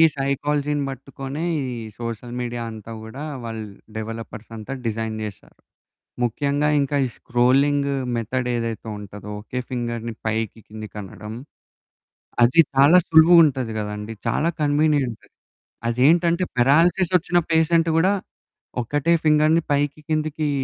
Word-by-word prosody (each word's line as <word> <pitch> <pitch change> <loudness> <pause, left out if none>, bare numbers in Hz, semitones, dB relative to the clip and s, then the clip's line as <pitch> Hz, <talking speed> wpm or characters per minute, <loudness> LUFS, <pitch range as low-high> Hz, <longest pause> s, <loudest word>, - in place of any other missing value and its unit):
సైకాలజీని 145 +1 0
పట్టుకునే 135 +3 -6 0.2
ఈ - - -2 0.4
social 115 +1 -5
media 120 -1 -3
అంతా 110 +1 -9
కూడా 130 +7 -8 0.2
వాళ్ళు 115 -2 -5 0.3
డెవలపర్స్ 115 0 -6
అంతా 110 +5 -6
డిజైన్ 110 0 -2
చేసారు. 105 -2 -9 0.7
ముఖ్యంగా 145 +5 +1
ఇంక 140 +1 -1
ఈ - - -1
స్క్రోలింగు 140 +4 +2 0.2
మెథడ్ 125 +2 -2
ఏదైతే 115 -1 -3
ఉంటదో 105 0 -9
ఒకే 125 +4 -5
ఫింగర్‌ని 120 -2 -3
పైకి, 110 0 -2
కిందకి 110 0 -9
అనడం 105 +3 -9 1.1
అది 125 +8 +6
చాలా 145 +7 +7
సులువుగా 165 +2 +7
ఉంటుంది 130 -6 -1
కదండీ. 105 +1 -4
చాలా 150 +8 +1
కన్వీనియంట్. 145 -5 +1 0.6
అదేంటంటే 170 +8 +3
పారాలిసిస్ 165 +8 +4
ఓచ్చిన 175 +1 +1
పేషెంట్ 165 +1 +3
కూడా 185 +5 +4 0.7
ఒక్కటే 145 +7 0
ఫింగర్‌ని 155 +2 +4
పైకి 145 +1 0
కిందకీ 155 -1 -1
135 Hz, 115 wpm, -23 LUFS, 115-150 Hz, 1.1 s, చాలా